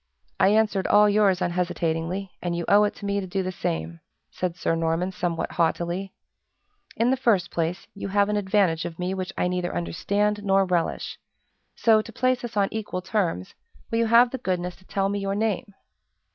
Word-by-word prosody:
"I - - +5
answered 210 -2 +2
all 210 0 +6
yours 200 -3 +3
unhesitatingly, 175 +1 -2
and 175 -1 -2
you 170 -1 -3
owe 205 +1 +6
it 205 - -2
to 205 - -9
me 200 0 0
to 190 - -5
do 190 +1 -1
the 185 - -3
same," 85 - -3 0.3
said 180 -2 -3
Sir 170 - 0
Norman, 165 +3 0
somewhat 175 -2 -2
haughtily. 175 +3 -1 0.8
"In 235 +3 +2
the - - +3
first 230 -9 +1
place, 170 +2 -2
you 200 - -6
have 200 +1 +2
an 210 - 0
advantage 190 -5 +2
of 165 - -6
me 180 +1 -2
which 185 -1 -4
I - - +1
neither 180 -1 -2
understand, 205 - -1
nor 195 -1 +3
relish; 175 -3 -1 0.6
so, 220 -2 +4
to 230 - -10
place 255 +2 0
us 235 -3 -6
on 200 -1 +3
equal 205 -4 -4
terms, 180 - -1 0.4
will 230 - +1
you 230 - +2
have 235 +2 +6
the 265 - -4
goodness 180 -1 -2
to 185 - -22
tell 195 0 0
me 200 +1 -1
your 195 0 -2
name?" 210 -2 -1
190 Hz, 195 wpm, -25 LUFS, 175-210 Hz, 0.8 s, all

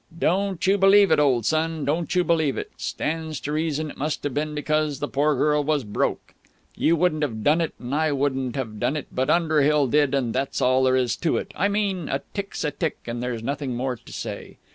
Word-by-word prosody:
"Don't 190 +1 0
you 195 +2 +3
believe 195 -1 +6
it, - - +5
old 130 -6 +2
son. 160 -1 0
Don't 165 +5 -1
you 180 - +4
believe 160 -5 +1
it. - - -5
Stands 160 -2 -3
to 145 - -4
reason 155 -1 -1
it - - -14
must 150 +2 -2
have 145 - -2
been 150 +2 -2
because 155 -1 0
the 145 - -3
poor 145 +2 +1
girl 150 +2 +2
was 150 -2 0
broke. 105 -2 -2 0.4
You 165 - +3
wouldn't 160 -2 +1
have 110 -7 -2
done 155 +3 +3
it 165 - -2
and 125 +2 -6
I 155 +1 +1
wouldn't 135 -3 -1
have 110 -6 -4
done 150 - 0
it, 145 - -7
but 130 +2 -1
Underhill 150 -3 +3
did, 145 +1 +2
and 125 -5 0
that's 135 +1 -1
all 130 +1 +3
there 130 0 +3
is 125 -2 +1
to 165 - 0
it. - - -5
I 200 - +2
mean, 200 -5 -1
a 135 +1 -2
tick's 200 -1 -4
a 150 - 0
tick, 155 +2 -2
and 120 0 -4
there's 120 -2 -3
nothing 135 0 -3
more 130 +1 -2
to 115 - -15
say. - - -7
150 Hz, 230 wpm, -24 LUFS, 135-160 Hz, 0.4 s, believe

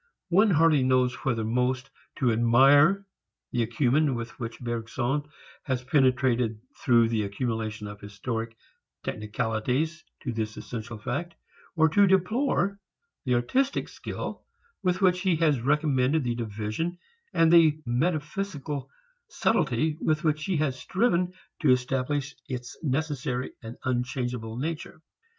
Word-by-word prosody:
One 200 +5 +5
hardly 160 -4 +4
knows 130 -1 +3
whether 115 -4 +1
most 125 +4 0 0.2
to 125 -3 +2
admire 135 - +5 0.5
the 120 - 0
acumen 130 +4 +2
with 115 -1 -5
which 115 -2 -5
Bergson 120 +4 -2 0.3
has 130 -3 -2
penetrated 125 -4 +2 0.2
through 115 -2 +3
the 115 -2 0
accumulation 110 +1 -3
of 105 0 -8
historic 110 +2 -5 0.5
technicalities 125 +9 -2 0.2
to 125 - -2
this 110 -1 -3
essential 115 -1 -6
fact, 140 +10 -4 0.4
or 160 -1 +5
to 200 +6 +5
deplore 200 +1 +1 0.5
the 125 -2 +2
artistic 260 - +1
skill - - -6 0.4
with 180 +1 0
which 180 -1 +4
he 185 -3 +2
has 155 -6 +2
recommended 145 +1 +2
the 120 -1 0
division 110 - -3 0.3
and 165 0 +4
the 160 -3 +6
metaphysical 150 +1 -2 0.4
subtlety 160 - +1
with 155 +1 +1
which 155 -1 +1
he 185 -4 0
has 140 -4 0
striven 180 - +1 0.3
to 155 - +2
establish 135 +3 +1 0.2
its 125 -2 -5
necessary 140 -3 -2
and 115 0 -8
unchangeable 125 -2 -2
nature. 160 +3 -4
130 Hz, 125 wpm, -27 LUFS, 120-160 Hz, 0.5 s, the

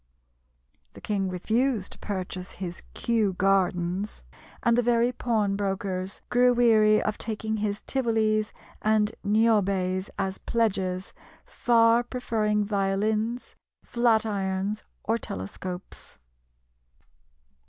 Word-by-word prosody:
The - - -13
king 195 -3 -1
refused 220 +4 0
to - - -10
purchase 185 -2 -5
his 175 -2 -6
"Kew 220 -4 +1
Gardens," 185 - 0 0.4
and 235 - +4
the 245 - +3
very 240 0 +2
pawnbrokers 195 -5 -1
grew 245 0 +4
weary 215 -3 +5
of 215 - -2
taking 220 0 -2
his 205 -1 -2
Tivolis 220 -4 +1 0.3
and 215 0 +2
Niobes 200 -3 +2
as 195 -1 -2
pledges, 190 -5 -1 0.3
far 230 0 +3
preferring 220 -4 -1
violins, 210 +4 -1 0.3
flat 235 -2 +2
irons, 200 0 -2 0.2
or 225 +2 0
telescopes. 180 - -7
210 Hz, 100 wpm, -26 LUFS, 195-230 Hz, 0.4 s, weary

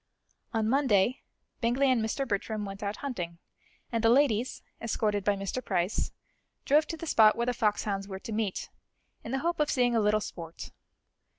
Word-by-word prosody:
On 220 -2 0
Monday, 250 -3 +3 0.4
Bingley 255 +3 +2
and 245 -3 +2
Mr. 270 +5 -1
Bertram 210 0 -2
went 195 0 -7
out 205 0 -3
hunting, 175 -11 -4 0.5
and 230 -1 -1
the 225 - +5
ladies, 250 -2 +2 0.2
escorted 210 -3 0
by 205 +1 +2
Mr. 195 +6 -3
Price, 185 -1 0 0.5
drove 300 +2 +4
to 330 - -4
the 330 - -6
spot 220 -8 +6
where 235 - 0
the 250 - +1
foxhounds 205 -3 0
were 190 -1 -5
to 210 - -8
meet, 215 -3 -2 0.5
in 230 - -6
the 270 - +1
hope 340 -1 0
of 300 - +2
seeing 245 -2 +2
a 225 - +3
little 210 +1 +3
sport. 165 -5 -7
220 Hz, 180 wpm, -29 LUFS, 200-250 Hz, 0.5 s, spot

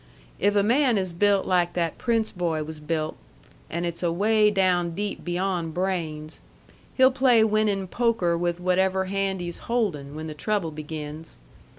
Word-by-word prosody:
If 205 0 +2
a 200 - +4
man 245 +1 +3
is 185 -3 -2
built 200 +2 +2
like 175 -2 +1
that 170 -3 -2
Prince 230 -2 0
boy 165 -4 -1
was 155 0 -8
built 155 0 -3 0.5
(and 170 +1 -2
it's 170 -1 -4
away 210 +5 +3
down 180 -4 +1
deep 205 +1 -4
beyond 175 -2 -2
brains), 165 -5 -3 0.5
he'll 260 0 +6
play 255 -4 +4
winnin' 210 -3 +1
poker 225 -6 +1
with 175 0 -1
whatever 190 +1 +1
hand 195 -1 -1
he's 175 -1 -5
holdin' 165 -13 -1
when 155 +1 -5
the 155 - -5
trouble 185 +1 -1
begins. 155 +1 -7
180 Hz, 160 wpm, -25 LUFS, 165-205 Hz, 0.5 s, he'll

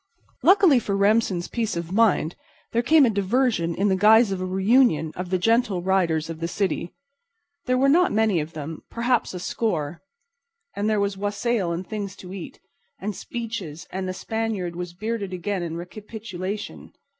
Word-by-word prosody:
Luckily 370 -7 +6
for 200 -3 -2
Remsen's 200 -3 +2
peace 225 -6 -2
of 170 0 -5
mind 200 -6 +2 0.4
there 235 - +2
came 300 +3 +5
a - - +3
diversion 200 -4 +1
in 200 - +1
the 190 - +3
guise 215 +2 +6
of 190 -1 -2
a - - -1
reunion 190 - +3
of 180 0 -5
the 185 - +2
Gentle 215 -2 +1
Riders 170 -4 +1
of 165 -1 -7
the 165 - -2
city. 180 -1 -2 0.7
There 255 0 +2
were 270 +2 +3
not 345 +6 +4
many 215 -4 +2
of 155 +2 -5
them—perhaps 190 - -2
a - - -4
score—and 220 - -5
there 215 -1 +2
was 200 -1 -1
wassail 205 -1 -1
and 170 +2 -3
things 205 -3 -5
to 185 0 -10
eat, 190 -3 -8 0.4
and 205 +1 -4
speeches 215 -10 -6
and 190 0 -3
the 185 - -2
Spaniard 215 -4 -3
was 175 0 -6
bearded 210 -1 -3
again 185 +1 -2
in 165 -1 -4
recapitulation. 205 +1 -7
200 Hz, 170 wpm, -24 LUFS, 180-230 Hz, 0.7 s, Luckily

